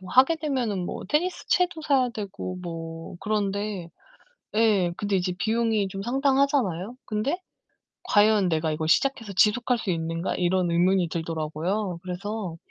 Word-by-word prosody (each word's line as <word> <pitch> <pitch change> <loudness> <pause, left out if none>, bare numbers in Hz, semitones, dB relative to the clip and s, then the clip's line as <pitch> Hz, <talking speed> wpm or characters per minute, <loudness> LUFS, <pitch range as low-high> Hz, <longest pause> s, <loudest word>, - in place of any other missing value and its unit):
뭐 185 -1 -10
하게 265 - +6
되면은 250 - -1
뭐 - - -5
테니스채도 355 +1 +1
사야 270 -4 +3
되고 200 -4 -5
뭐 165 0 -6
그런데 205 -3 -2 0.7
예, 210 -6 +3
근데 205 -1 0
이제 180 0 0
비용이 220 -2 +1
좀 195 +1 -6
상당하잖아요? 265 - +1
근데 235 - -1 0.6
과연 205 -2 +4
'내가 160 -1 +1
이걸 155 +1 -2
시작해서 230 - +2
지속할 230 +5 +3
수 200 - -3
있는가.' 165 +1 -2
이런 180 0 +1
의문이 180 +1 +3
들더라고요. 165 +4 -2
그래서 185 -1 -4
200 Hz, 315 characters per minute, -26 LUFS, 175-235 Hz, 0.7 s, 하게